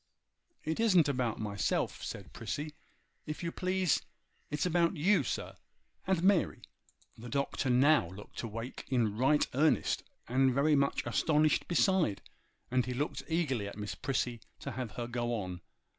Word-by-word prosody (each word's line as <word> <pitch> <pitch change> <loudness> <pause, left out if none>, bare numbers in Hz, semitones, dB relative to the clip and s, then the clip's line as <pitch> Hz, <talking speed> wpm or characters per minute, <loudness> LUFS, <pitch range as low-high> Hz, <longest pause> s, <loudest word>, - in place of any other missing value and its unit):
'It 160 +4 -2
isn't 185 -9 +5
about 125 -5 0
myself,' 100 -2 -1
said - - -7
Prissy. 150 +1 -4 0.5
'If 155 +3 -5
you 170 - -1
please, 185 -3 +1 0.5
it's 150 +2 -1
about 175 0 +2
you, 190 +7 +4
sir, - - -3 0.5
and 185 -3 +1
Mary.' 195 -2 +3 0.6
The 120 +2 -8
Doctor 140 -1 -1
now 130 - +4
looked 95 +3 -8
awake 115 +2 -6
in 115 -5 +1
right 135 +6 +3
earnest, 150 +4 +2 0.3
and 130 +1 +3
very 150 +2 +4
much 140 0 +1
astonished 155 -1 +2
besides; 175 - +2 0.5
and 125 -1 +2
he 125 - -2
looked 145 +4 -2
eagerly 140 -11 0
at 100 - -8
Miss 105 0 -4
Prissy 125 -4 -2 0.2
to - - -4
have 125 -3 -4
her 120 - -3
go 120 0 -2
on. 90 -4 -5
135 Hz, 150 wpm, -32 LUFS, 120-160 Hz, 0.6 s, isn't